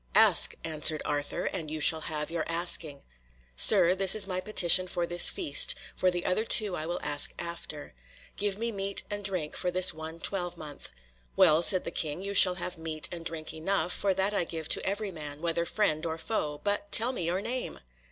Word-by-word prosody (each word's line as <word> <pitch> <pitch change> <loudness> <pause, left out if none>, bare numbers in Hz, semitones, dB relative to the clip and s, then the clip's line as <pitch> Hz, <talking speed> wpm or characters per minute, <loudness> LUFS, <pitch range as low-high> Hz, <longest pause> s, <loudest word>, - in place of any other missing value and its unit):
"Ask," - - +4
answered 155 -1 -1
Arthur, 145 -1 -4
"and 165 -5 -5
you 155 +1 -6
shall 160 +1 +3
have 150 -1 -5
your 165 -2 -3
asking." 165 -4 -1 0.5
"Sir, 170 - +5
this 190 +1 +4
is 210 -2 +4
my 185 -1 -4
petition 185 -3 +5
for 175 -1 -2
this 175 0 +3
feast, 140 - +3 0.2
for 185 - 0
the 175 -1 -4
other 200 +4 -1
two 210 -4 +2
I 155 -1 -6
will 175 - -4
ask 145 0 +2
after. 170 - -8 0.4
Give 200 -1 -2
me 230 +2 -4
meat 195 -1 -2
and 205 0 -6
drink 185 -6 -4
for 180 - -3
this 185 +1 +5
one 160 +1 -9
twelvemonth." 175 -6 -4 0.5
"Well," 155 +2 +4
said 185 +1 +3
the - - -7
king, 155 +3 -3
"you 200 0 -5
shall 185 -2 +6
have 180 -1 -6
meat 160 -1 -5
and 170 -2 -8
drink 160 -2 -5
enough, 180 +3 -2
for 195 -2 -2
that 195 +2 -1
I 200 - -1
give 160 -2 -7
to - - +1
every 200 +1 -4
man, 150 -3 -9
whether 170 +1 -3
friend 160 -8 -2
or 160 -1 -4
foe. 150 -6 -4
But 205 0 -3
tell 235 +3 +5
me 180 -10 -5
your 175 +3 -2
name!" 240 +5 -6
175 Hz, 200 wpm, -27 LUFS, 160-195 Hz, 0.5 s, shall